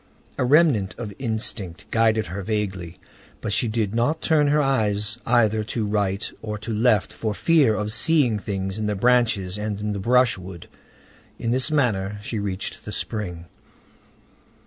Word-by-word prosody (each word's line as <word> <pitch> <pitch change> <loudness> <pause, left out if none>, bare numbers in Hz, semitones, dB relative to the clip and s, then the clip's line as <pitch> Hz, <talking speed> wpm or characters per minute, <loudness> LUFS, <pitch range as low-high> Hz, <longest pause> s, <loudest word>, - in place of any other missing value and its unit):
A - - +2
remnant 130 - +3
of 110 -4 -6
instinct 110 -7 -3
guided 110 -1 +2
her 95 +4 -5
vaguely. 95 -4 -3 0.4
But 105 - -3
she 120 - +1
did 110 -2 -1
not 120 +8 +1
turn 155 -3 +2
her 150 +1 +3
eyes 110 -6 0
either 110 -3 +3
to 110 0 -2
right 100 -1 -1
or 105 -1 -4
to 110 +2 -5
left, 110 -2 +2
for 110 -2 -3
fear 150 -9 +3
of 105 0 -1
seeing 125 -3 +3
things 95 0 -4
in 105 - -1
the 105 - -1
branches 105 -4 +2
and 105 -1 -3
in 105 0 -2
the 100 - -4
brushwood. 95 -6 +1 0.7
In 115 - -2
this 130 +4 +2
manner 105 -9 0
she 110 +1 -3
reached 100 -2 -4
the 105 - -7
spring. 90 -7 -4
110 Hz, 160 wpm, -23 LUFS, 100-120 Hz, 0.7 s, remnant